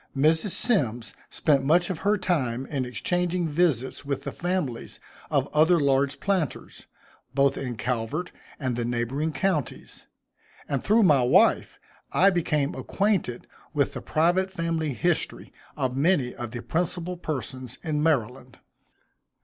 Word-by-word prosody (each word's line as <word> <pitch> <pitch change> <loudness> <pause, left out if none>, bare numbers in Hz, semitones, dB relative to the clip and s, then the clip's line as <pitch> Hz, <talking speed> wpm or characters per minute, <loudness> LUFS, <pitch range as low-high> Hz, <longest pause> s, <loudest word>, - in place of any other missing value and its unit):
Mrs. 160 +8 +3
Symmes 125 - 0 0.2
spent 140 -4 +2
much 175 +6 +3
of 170 - -5
her 205 +5 +2
time 135 -9 -1
in 135 -2 -2
exchanging 175 +8 -1
visits 150 -6 0
with 140 -1 -3
the - - -4
families 175 -9 -3 0.3
of - - +2
the - - -14
other 160 +3 +4
large 140 -1 +1
planters, 190 -8 -2 0.5
both 140 0 +3
in 125 -4 -4
Calvert 125 +9 -2 0.3
and 130 -4 -1
the 120 - -2
neighboring 120 +6 -1
counties; 160 -5 -2 0.6
and 140 -3 -2
through 220 +2 +4
my 150 -8 +5
wife, 125 - +3 0.3
I 195 +2 +5
became 150 -4 0
acquainted 195 - -1 0.3
with - - +1
the - - -5
private 175 +5 +1
family 165 -5 -2
history 175 +2 -1 0.2
of 130 -1 -1
many 140 -3 +2
of 120 -1 -6
the 120 0 -7
principal 175 +1 -2
persons 130 -6 -5
in 155 -3 -1
Maryland. 130 -5 -1
150 Hz, 140 wpm, -26 LUFS, 130-175 Hz, 0.6 s, my